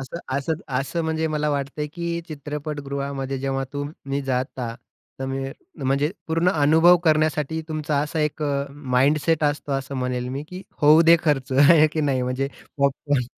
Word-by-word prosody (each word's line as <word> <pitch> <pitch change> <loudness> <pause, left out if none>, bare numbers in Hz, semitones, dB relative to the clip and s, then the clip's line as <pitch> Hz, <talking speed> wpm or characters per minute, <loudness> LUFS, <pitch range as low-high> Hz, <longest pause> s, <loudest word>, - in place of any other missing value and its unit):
असं 135 +6 -6 0.2
असं 150 +3 -1 0.3
असं 165 +5 -2
म्हणजे 160 0 0
मला 150 -1 -1
वाटतंय, 145 +1 -2
की 170 +2 -4
चित्रपटगृहामध्ये 140 -2 -4
जेव्हा 135 0 -1
तुम्ही 145 -1 -4
जाता 125 -2 -2 0.5
तमी 135 0 -3 0.4
म्हणजे 140 +4 +1 0.2
पूर्ण 165 +3 +2
अनुभव 160 +3 +5
करण्यासाठी 155 0 +2
तुमचा 155 -2 -1
असा 155 +2 -2
एक 150 0 -1
अ, 140 -1 0
माइंडसेट 145 +3 +1
असतो 145 -1 -1
असं 135 0 -3
म्हणेल 125 -1 -2
मी 135 +3 -4
की 185 +1 -8 0.2
होऊ 155 +3 +7
दे 170 +1 +7
खर्च, 135 -4 +1
आहे 150 +4 +7
की 155 - -1
नाही, 135 -4 +1
म्हणजे 130 +2 -1 0.3
पॉपकॉर्न 140 -2 +1
145 Hz, 150 wpm, -23 LUFS, 135-155 Hz, 0.5 s, होऊ